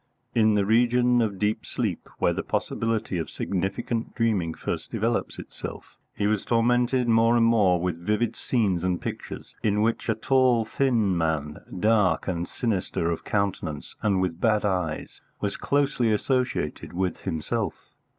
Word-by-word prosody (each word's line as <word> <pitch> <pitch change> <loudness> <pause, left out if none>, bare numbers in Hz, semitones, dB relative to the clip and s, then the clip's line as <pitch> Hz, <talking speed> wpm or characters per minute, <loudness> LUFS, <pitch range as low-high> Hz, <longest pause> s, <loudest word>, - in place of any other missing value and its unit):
In 110 -2 +4
the 100 -1 +2
region 120 +2 +3
of 105 -4 -1
deep 105 +2 0
sleep, - - -3
where - - +2
the - - -2
possibility 115 -5 -1
of 80 - -4
significant 100 +5 -2
dreaming 100 -8 0
first - - -4
develops - - -1
itself, - - -9 0.2
he 100 - -1
was 105 -1 +1
tormented 120 +2 +2
more 115 +1 +4
and 115 - +4
more 100 -6 +4
with 85 -1 -3
vivid 105 +4 0
scenes 100 -8 0
and 90 -1 0
pictures - - -7
in 105 -2 +2
which 115 +1 0
a 110 - +3
tall 125 0 +3
thin 110 -5 +1
man, 80 -3 -1 0.2
dark 105 -2 +3
and 85 -2 -2
sinister 95 -6 -1
of 85 - -4
countenance, 100 -7 -2
and 100 -3 +2
with 90 -2 -2
bad 105 -2 +2
eyes, 90 -6 -2 0.2
was 100 -1 -2
closely 140 -5 +1
associated 125 +4 -1
with 90 -1 -1
himself. 80 -5 -2
105 Hz, 150 wpm, -26 LUFS, 90-115 Hz, 0.2 s, In